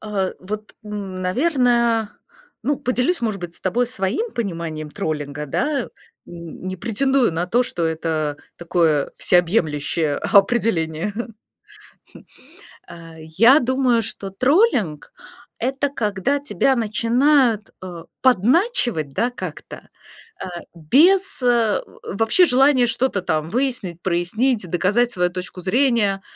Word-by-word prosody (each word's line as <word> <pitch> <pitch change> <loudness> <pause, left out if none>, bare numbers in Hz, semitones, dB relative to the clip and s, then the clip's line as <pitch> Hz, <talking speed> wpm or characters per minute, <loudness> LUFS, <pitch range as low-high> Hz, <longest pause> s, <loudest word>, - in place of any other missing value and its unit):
А 200 -3 -2
вот, 210 +3 -7
наверное, 225 - 0 0.5
ну, 290 -2 0
поделюсь, 250 +8 0
может 215 -5 -2
быть, 175 -1 -7
с - - -9
тобой 235 +6 0
своим 245 - -2
пониманием 165 -8 -4
троллинга, 150 -1 -4
да? 275 - -1 0.4
Н 170 +1 -9
не 185 - -4
претендую 245 +3 +1
на 170 +2 -2
то, 240 +7 +2
что 175 -8 -3
это 155 -2 -2 0.2
такое 165 -4 0
всеобъемлющее 160 -4 +1
определение. 200 -5 +1 2.0
Я 185 - +4
думаю, 255 -2 +1
что 195 -1 -6
троллинг- 245 - +1 0.5
это 270 +4 -1
когда 230 +1 -1
тебя 270 -1 +1
начинают, 235 +1 +2
а, 175 -3 -8 0.2
подначивать, 245 - +2
да, 240 - 0
как-то, 245 - -9 0.5
а, - - -5 0.3
без 340 - +3
вообще, 225 - +1
э, - - +2
желания 260 -1 +4
что-то 230 -4 -1
там 155 -2 -1
выяснить, 225 -8 -2
прояснить, 190 +4 0
доказать 210 +8 +1
свою 180 -3 0
точку 180 0 -7
зрения, 215 -2 +2
210 Hz, 110 wpm, -21 LUFS, 175-250 Hz, 2.0 s, Я